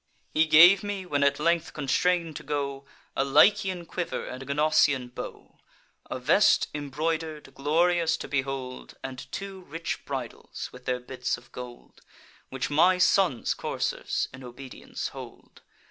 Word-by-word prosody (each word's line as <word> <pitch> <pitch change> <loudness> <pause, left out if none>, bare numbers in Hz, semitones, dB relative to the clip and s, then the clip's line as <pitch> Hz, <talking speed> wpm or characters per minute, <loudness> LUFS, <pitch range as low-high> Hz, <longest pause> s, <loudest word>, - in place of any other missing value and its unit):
He 160 +1 +3
gave 175 +5 +8
me, 205 -2 -4
when 145 -5 -1
at 140 0 +2
length 170 +1 +1
constrain'd 165 +3 +1
to - - -8
go, 140 -2 -3 0.3
A 135 - +2
Lycian 180 +5 +4
quiver 175 +1 -4
and 130 - -7
a - - -8
Gnossian 140 -3 +2
bow, - - -9 0.5
A - - -3
vest 150 +11 +4
embroider'd, 150 0 -3
glorious 165 +4 +2
to - - -7
behold, 135 -2 -4
And 130 0 -7
two 195 -1 -6
rich 165 +3 -5
bridles, 130 -4 -6
with 125 0 -13
their 125 0 0
bits 125 0 -3
of 120 - -18
gold, 125 -1 -10 0.5
Which 135 +2 -3
my 180 +5 +5
son's 180 -7 +3
coursers - - -2
in 130 0 -10
obedience 125 +1 -7
hold. - - -12
150 Hz, 145 wpm, -27 LUFS, 135-170 Hz, 0.5 s, gave